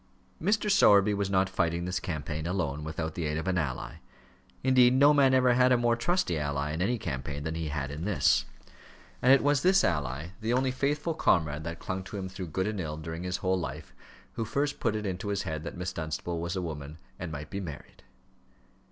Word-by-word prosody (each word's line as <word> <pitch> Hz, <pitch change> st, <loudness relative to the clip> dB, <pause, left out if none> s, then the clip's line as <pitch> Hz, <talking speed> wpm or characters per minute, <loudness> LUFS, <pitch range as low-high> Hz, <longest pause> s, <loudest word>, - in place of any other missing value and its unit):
Mr. 210 Hz, +4 st, +1 dB
Sowerby 105 Hz, -, +6 dB
was 100 Hz, -1 st, -1 dB
not 95 Hz, 0 st, +2 dB
fighting 85 Hz, -2 st, -1 dB
this 90 Hz, 0 st, -1 dB
campaign 80 Hz, -2 st, -4 dB
alone, 80 Hz, -6 st, -2 dB
without 80 Hz, +1 st, -4 dB
the 85 Hz, -, -3 dB
aid 75 Hz, +1 st, -1 dB
of 80 Hz, -, -4 dB
any 90 Hz, -1 st, +1 dB
ally. 65 Hz, -5 st, -5 dB, 0.7 s
Indeed, 130 Hz, -1 st, +5 dB
no 140 Hz, +3 st, +6 dB
man 135 Hz, -2 st, +5 dB
ever 125 Hz, -1 st, +4 dB
had 125 Hz, +1 st, +4 dB
a 125 Hz, -, +5 dB
more 120 Hz, -1 st, +2 dB
trusty 120 Hz, -, 0 dB
ally 75 Hz, 0 st, -2 dB
in 80 Hz, +3 st, -3 dB
any 120 Hz, +6 st, +1 dB
campaign 70 Hz, -, -4 dB
than 80 Hz, +1 st, -3 dB
he 80 Hz, -1 st, -3 dB
had 70 Hz, -2 st, -3 dB
in 75 Hz, +3 st, -5 dB
this. 90 Hz, -9 st, +2 dB, 0.8 s
And 125 Hz, -, +5 dB
it 135 Hz, -, +6 dB
was 145 Hz, -1 st, +3 dB
this 190 Hz, +1 st, +4 dB
ally, 75 Hz, -1 st, -1 dB
the 115 Hz, +2 st, 0 dB
only 130 Hz, +1 st, +2 dB
faithful 145 Hz, +5 st, -1 dB
comrade 80 Hz, -, +1 dB
that 85 Hz, 0 st, -4 dB
clung 95 Hz, +2 st, -4 dB
to 100 Hz, -, -7 dB
him 95 Hz, -1 st, -4 dB
through 95 Hz, -1 st, -6 dB
good 95 Hz, +4 st, -1 dB
and 105 Hz, -1 st, -2 dB
ill 75 Hz, -3 st, -4 dB
during 80 Hz, +1 st, -6 dB
his 90 Hz, +1 st, -2 dB
whole 95 Hz, 0 st, +2 dB
life, 75 Hz, -3 st, -6 dB, 0.4 s
who 115 Hz, -, -2 dB
first 140 Hz, +6 st, -1 dB
put 115 Hz, -3 st, 0 dB
it 105 Hz, 0 st, -3 dB
into 95 Hz, +1 st, -3 dB
his 100 Hz, -1 st, -1 dB
head 80 Hz, -1 st, -4 dB
that 85 Hz, -, -6 dB
Miss 90 Hz, +1 st, -3 dB
Dunstable 80 Hz, +1 st, -3 dB
was 85 Hz, +2 st, -3 dB
a 95 Hz, -, -2 dB
woman 75 Hz, -2 st, -6 dB, 0.2 s
and 90 Hz, -2 st, -5 dB
might 75 Hz, 0 st, -7 dB
be 100 Hz, -, -3 dB
married. 85 Hz, -7 st, -9 dB
90 Hz, 220 wpm, -29 LUFS, 80-120 Hz, 0.8 s, Sowerby